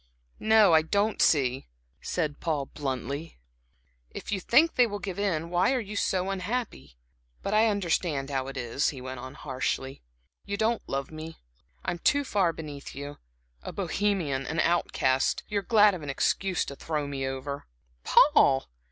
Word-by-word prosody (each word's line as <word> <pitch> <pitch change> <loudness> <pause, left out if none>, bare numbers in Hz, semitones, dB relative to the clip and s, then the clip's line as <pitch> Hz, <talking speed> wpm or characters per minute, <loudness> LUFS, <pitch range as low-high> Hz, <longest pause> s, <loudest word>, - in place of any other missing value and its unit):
"No, 220 -4 +5
I 160 - +7
don't 200 +6 0
see," 135 -3 +2 0.3
said 155 -5 -2
Paul, 150 -5 -1
bluntly. 140 +3 -5 0.7
"If - - -7
you 200 - 0
think 300 - +4
they 245 -1 +4
will 205 -2 -4
give 200 -1 -5
in, 170 -5 -1
why 180 +8 +3
are 260 - +1
you 210 -2 -6
so 190 -1 0
unhappy? 190 - -4 0.5
But 200 - -2
I 220 +2 +5
understand 170 -8 0
how 135 -1 -1
it 135 - -7
is" 125 +3 0
he 135 - -7
went 130 0 -6
on, 130 +2 -8
harshly, 135 -1 -3 0.4
"you 200 0 -4
don't 225 +1 +1
love 135 +1 -3
me. 160 +1 -8 0.5
I'm 175 - -2
too 285 +10 +3
far 195 -9 +1
beneath 150 -3 -8
you 145 +1 -7 0.4
a - - -6
Bohemian 180 -7 -1
and 160 - -2
an - - +3
outcast. 135 -6 +1
You 210 -1 0
are - - -5
glad 210 -1 +5
of 180 - -5
an 145 - -6
excuse 185 +6 0
to 140 - -7
throw 150 0 -3
me 135 -1 -3
over." 135 +2 -5 0.4
"Paul!" 135 -1 +5
160 Hz, 170 wpm, -28 LUFS, 135-200 Hz, 0.7 s, I